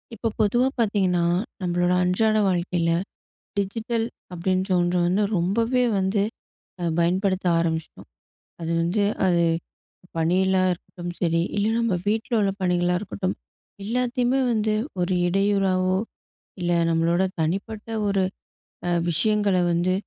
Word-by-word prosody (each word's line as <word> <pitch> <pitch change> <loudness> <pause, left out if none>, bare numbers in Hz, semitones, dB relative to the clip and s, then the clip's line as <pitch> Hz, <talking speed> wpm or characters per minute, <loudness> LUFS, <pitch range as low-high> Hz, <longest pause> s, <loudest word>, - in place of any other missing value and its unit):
இப்போ 225 - -2
பொதுவா 240 +5 +3
பாத்தீங்கன்னா, 195 -6 +2 0.4
நம்பளோட 175 0 +1
அன்றாட 215 +5 +2
வாழ்க்கையில 175 -2 0 0.7
டிஜிட்டல் 225 +3 -1 0.3
அப்டின்ற 185 +2 -1
ஒன்று 175 +1 +1
வந்து 190 +4 +2
ரொம்பவே 230 +8 +1 0.2
வந்து 190 +2 +1 0.6
அ - - -2 0.2
பயன்படுத்த 185 +2 +1
ஆரம்பிச்ட்டோம். 160 -1 -3 0.5
அது 165 0 -2
வந்து 180 +5 +1 0.2
அது 175 -2 +3 0.7
பணியில 185 +4 +2 0.2
இருக்கட்டும் 175 0 -6
சரி, 165 -1 +2 0.2
இல்லை 205 +2 +2
நம்ம 230 -3 +1
வீட்ல 220 +3 -1
உள்ள 200 -1 +2
பணிகளா 180 -1 +2
இருக்கட்டும், 190 -1 -3 0.5
எல்லாத்தயுமே 250 +3 0
வந்து 215 -1 +1 0.3
ஒரு 175 +1 0
இடையூறாவோ 190 -1 +2 0.6
இல்லை 175 -1 +1
நம்மளோட 165 +2 +2 0.2
தனிப்பட்ட 200 +7 -2 0.2
ஒரு 195 -1 +2 0.7
அ - - +1 0.2
விஷயங்கள 205 +2 +2
வந்து 175 +2 +1
190 Hz, 115 wpm, -24 LUFS, 175-210 Hz, 0.7 s, பொதுவா